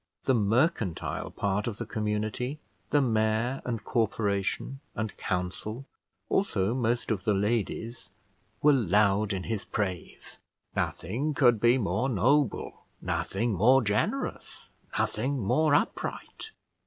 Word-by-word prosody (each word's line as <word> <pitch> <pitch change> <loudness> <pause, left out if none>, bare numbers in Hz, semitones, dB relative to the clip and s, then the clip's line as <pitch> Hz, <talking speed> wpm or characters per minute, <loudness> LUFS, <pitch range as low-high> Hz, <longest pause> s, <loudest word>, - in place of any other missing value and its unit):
The 130 - +3
mercantile 115 - +1
part 100 +1 -1
of 110 -3 -3
the 120 - -4
community, 110 +6 -2 0.3
the 145 -1 +3
mayor 110 +2 +1
and 115 -4 -3
corporation, 110 +3 -1 0.2
and 110 -1 -3
council, 95 +7 -3 0.4
also 110 - +1
most 120 -1 0
of 100 -4 -1
the 105 -3 +2
ladies, 115 +3 -2 0.5
were 150 0 +7
loud 105 -2 +3
in 95 -2 -2
his 110 -1 -3
praise. 95 -4 -4 0.4
Nothing 140 +9 -1
could 120 -6 +5
be 120 +2 +5
more 110 +3 0
noble, 130 +2 +1
nothing 115 -1 -1
more 125 +7 +5
generous, 105 0 -2 0.3
nothing 130 +5 0
more 145 +8 +3
upright. 440 - -2
110 Hz, 115 wpm, -28 LUFS, 105-125 Hz, 0.5 s, were